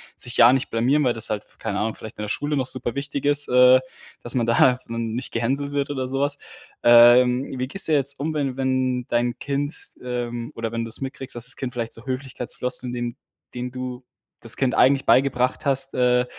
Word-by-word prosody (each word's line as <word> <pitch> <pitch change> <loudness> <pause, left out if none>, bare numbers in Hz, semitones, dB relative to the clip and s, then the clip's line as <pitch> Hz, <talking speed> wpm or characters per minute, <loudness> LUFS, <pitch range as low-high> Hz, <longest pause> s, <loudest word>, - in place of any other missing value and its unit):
sich 120 - -1
ja 120 0 +7
nicht 135 - -1
blamieren, 130 +6 +2
weil 125 -3 +2
das 115 - -1
halt 105 -1 -3
v - - -23
keine 105 -3 -3
Ahnung, 110 +1 -1
vielleicht 110 - -11
in 105 - -5
der 105 - -5
Schule 145 +6 -2
noch 130 - 0
super 125 -2 -3
wichtig 140 0 -4
ist, 145 0 +5
äh, 125 +1 +6 0.4
dass 120 - 0
man 120 - +1
da 125 +2 +4
n 115 -1 -4
nicht 125 +1 -5
gehänselt 135 +5 0
wird 140 -1 -2
oder 130 -2 -3
sowas. 140 +2 -1 0.5
Ähm, 125 +2 +6
wie 130 0 -3
gehst 195 +7 +3
jetzt 140 -2 +2
um, 155 +3 -2
wenn 150 -2 -1
wenn 130 -2 -1
dein 120 0 -1
Kind, 145 +2 -3 0.3
ähm 120 -1 -4
oder 115 -1 -4
wenn 115 0 -3
du 115 - -6
es 110 - -2
mitkriegst, 135 -1 -4
dass 120 - -2
das 125 - -1
Kind 130 -1 -5
vielleicht 115 -2 -4
so 115 - -8
Höflichkeitsfloskeln, 130 -1 -3
dem 120 -1 -4 0.4
den 125 0 -5
du 130 0 -7 0.4
das 115 - +1
Kind 130 -2 0
eigentlich 135 +1 +3
beigebracht 130 -1 +2
hast, 135 -1 +1
äh, 125 0 +2
125 Hz, 210 wpm, -22 LUFS, 120-135 Hz, 0.5 s, ja